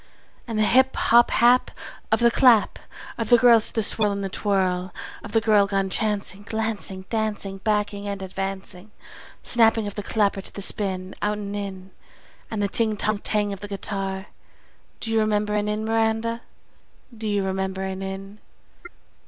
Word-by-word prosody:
And 225 -2 -3
the 215 - +3
hip! 260 +5 +4
hop! 235 +1 +4
hap! 245 +2 +4 0.4
Of - - +2
the 235 0 +5
clap 235 -4 +4 0.4
Of 225 - -2
the 240 - +7
hands 230 -2 +5
to - - -3
the 225 - +3
swirl 210 0 +4
and 200 0 -3
the 195 - -3
twirl 185 -2 0 0.3
Of 225 - -8
the 225 - +2
girl 210 -2 +4
gone 195 -1 -1
chancing, 205 -1 -2
Glancing, 205 -4 -3
Dancing, 210 -3 -2
Backing 205 -1 -1
and 200 -1 -4
advancing, 190 0 -5 0.5
Snapping 225 -2 +3
of 205 - -5
the 205 - -5
clapper 200 -1 0
to - - -9
the - - -9
spin 190 -2 -1
Out 210 0 0
and 205 -1 -5
in 195 -2 -6 0.6
And 215 -2 -2
the - - +2
ting, 220 +1 0
tong, 215 0 -1
tang 210 -1 0
of 195 - -8
the 205 - -7
guitar! 195 -1 -3 0.7
Do 225 - -4
you 225 - +3
remember 210 -1 0
an 210 0 0
Inn, 210 +1 -2
Miranda? 225 +1 0 0.7
Do 220 -1 -5
you 205 -1 0
remember 190 0 -2
an 190 0 -4
Inn? 195 +2 -7
205 Hz, 175 wpm, -24 LUFS, 195-220 Hz, 0.7 s, the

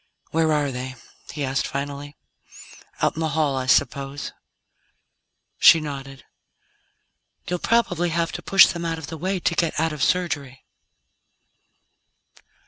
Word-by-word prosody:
"Where 160 0 +2
are 145 -2 +1
they?" 130 +1 -6 0.4
he 145 0 -4
asked 135 +3 -1
finally. 145 +1 -5 0.9
"Out - - +2
in - - -5
the 160 -1 0
hall, 150 -3 +2
I 130 -1 -3
suppose?" 140 +2 0 1.3
She 165 - +8
nodded. 135 -3 -7 1.2
"You'll 180 0 -2
probably 180 -7 +1
have 170 0 -1
to - - -6
push 195 -1 +7
them 170 -1 -3
out 165 -1 -2
of 160 - -7
the - - -3
way 185 +3 -1
to - - +1
get 170 -3 0
out 160 0 0
of 150 - -7
Surgery." 145 -7 -1
150 Hz, 135 wpm, -23 LUFS, 140-170 Hz, 1.3 s, She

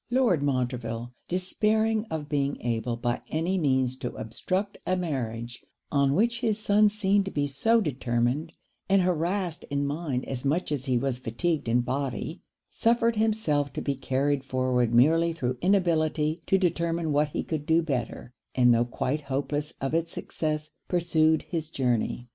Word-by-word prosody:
Lord 240 - +3
Montreville, 125 -3 -2
despairing 215 +4 +1
of 160 -7 -5
being 140 -1 -1
able 115 0 -1
by 120 0 -1
any 170 +4 0
means 130 -4 +1
to 125 -2 -5
obstruct 185 - -3
a 185 - +2
marriage 120 -8 -4 0.3
on 140 -1 +3
which 235 +4 +2
his 225 -3 0
son 210 0 +4
seemed 205 -1 +2
to - - -3
be 145 -5 -1
so 225 +12 +2
determined, 130 - -1 0.4
and 195 -1 +4
harrassed 180 0 -1
in 140 0 -1
mind 140 -3 -2
as 130 -2 -4
much 150 +5 0
as 140 -3 -2
he 130 -3 +2
was 130 0 -1
fatigued 145 +6 -1
in 120 +2 +3
body, 135 +5 -3 0.3
suffered 230 0 +2
himself 210 -11 +1
to - - -3
be 140 - 0
carried 135 +1 0
forward 130 -3 +1
merely 165 +8 +4
through 125 -6 -2
inability 165 -4 +2
to 195 - +4
determine 170 -3 0
what 145 +1 +2
he - - -3
could 155 -2 -4
do 165 +1 +4
better; 125 -4 -3 0.2
and 125 -2 +5
though 120 +1 +3
quite 130 +4 -2
hopeless 145 +3 -2
of 135 +2 -2
it's 165 0 0
success, 155 -1 -3 0.2
pursued 160 -3 +2
his 160 -3 -4
journey. 125 -3 -1
150 Hz, 160 wpm, -27 LUFS, 130-180 Hz, 0.4 s, and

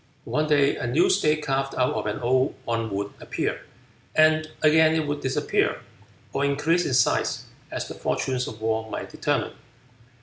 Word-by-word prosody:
One 155 0 0
day 145 -2 +3
a 120 - -3
new 150 +9 +3
state 155 -5 +2
carved 135 -1 -1
out 125 0 +1
of 110 -1 -3
an 105 - -3
old 130 +3 +2
one 115 -1 -1
would 100 0 -3
appear, - - -3 0.5
and 155 0 +4
again 160 +1 +5
it 160 -1 0
would 145 0 -3
disappear, 130 -1 0 0.5
or 140 - 0
increase 150 +5 +1
in 130 - 0
size, 125 - +1 0.2
as - - -4
the - - -7
fortunes 130 -1 -2
of 110 - -8
war 110 0 -1
might 105 - -5
determine. - - -1
135 Hz, 170 wpm, -25 LUFS, 120-155 Hz, 0.5 s, again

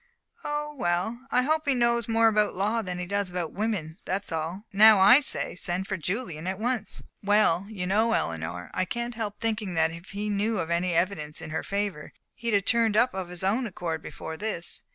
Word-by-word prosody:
"Oh, 295 0 -3
well 225 +3 -2
I 250 -1 +3
hope 310 +2 0
he 275 - +3
knows 235 -1 +2
more 225 0 +4
about 210 -1 +2
law 210 +5 +1
than 180 -4 -4
he 180 - -3
does 200 +1 -1
about 175 -2 -4
women, 195 -6 -2
that's 195 +1 -3
all. 165 +6 -3
Now 215 +1 +8
I 205 +8 +8
say, 290 - 0
send 180 +1 -1
for 195 - -2
Julian 180 - -4
at 190 0 -2
once." 230 0 -3 0.2
"Well, 200 -3 +3
you 195 -5 -4
know, 215 +5 +2
Eleanor, 85 - -3
I 185 - +1
can't 235 +6 -3
help 215 -3 -4
thinking 215 -5 -1
that 160 0 +3
if 170 +2 -10
he 205 +1 -4
knew 210 +2 0
of 165 -3 -2
any 175 0 +1
evidence 165 -4 -1
in 160 - -7
her - - -1
favor 200 -6 -3 0.2
he'd 230 -2 -1
have 200 -1 +1
turned 230 -2 +2
up 245 +2 +4
of 190 -2 -4
his 180 +1 -7
own 225 +6 +1
accord 170 -5 -4
before 160 - -7
this. 205 -5 -3
200 Hz, 210 wpm, -27 LUFS, 175-225 Hz, 0.2 s, Now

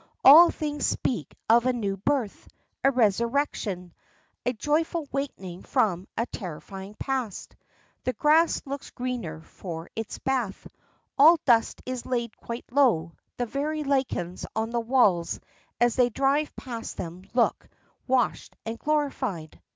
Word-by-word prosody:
All 325 +6 +10
things 295 -2 -3
speak 245 - -2
of 235 +2 +5
a 255 - +3
new 205 -5 -1
birth, 225 +1 -1 0.4
a 275 - +6
resurrection, 230 - 0 0.5
a 250 - +1
joyful 305 +5 0
waking 195 -11 -4
from 190 -2 0
a 230 - +1
terrifying 195 +1 -8
past. 260 -7 -3 0.5
The 255 - 0
grass 315 +4 +3
looks 280 0 -6
greener 240 -11 -4
for 165 0 -8
its 225 -1 -4
bath, 250 -7 -2 0.5
all 320 +4 +9
dust 230 -3 +3
is 255 -1 -5
laid 235 -3 -2
quite 235 +1 -6
low, 235 - +3 0.3
the 245 - 0
very 300 +5 -2
lichens 260 -11 -1
on 220 +1 -1
the 240 - 0
walls 220 -9 +2 0.4
as 240 0 +3
they 250 -1 +4
drive 275 +5 +1
past 235 -4 -6
them 175 +1 -6
look 240 - +1 0.4
washed 255 -3 0
and 225 +1 -4
glorified. 265 - -2
240 Hz, 135 wpm, -26 LUFS, 200-275 Hz, 0.5 s, All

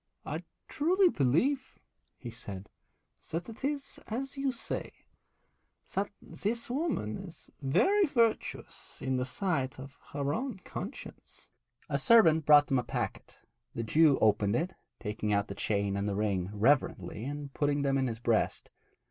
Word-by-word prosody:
'I - - -3 0.3
truly 360 +5 +3
believe,' 250 - +1 0.4
he 120 - -7
said, 100 -3 -8 0.6
'that 165 +7 -3
it 225 +3 -11
is 280 0 -2
as 265 +6 -3
you 275 -1 0
say, 240 - -4 1.0
that 200 +1 0
this 230 +3 -3
woman 265 - -1
is 180 -4 -10
very 380 - +3
virtuous 230 -5 -1
in 130 0 -1
the 125 - 0
sight 135 -1 -1
of 135 +1 -10
her 140 0 0
own 255 - -3
conscience.' 190 +5 -9 0.4
A - - 0
servant 165 - +5
brought 145 -1 +8
them 135 -2 +2
a - - -2
packet. - - -4 0.3
The 115 - -2
Jew 150 +4 +5
opened 105 -1 +3
it, 175 +7 -1 0.3
taking 105 -1 -2
out 100 0 +1
the - - -3
chain 100 -1 0
and 100 +1 -1
the 100 - -2
ring 100 -3 0
reverently 110 0 +1
and 145 0 -5
putting 145 -1 +1
them 135 -1 +2
in 130 - +1
his 115 -2 -3
breast. 115 -1 0
145 Hz, 150 wpm, -31 LUFS, -, 1.0 s, brought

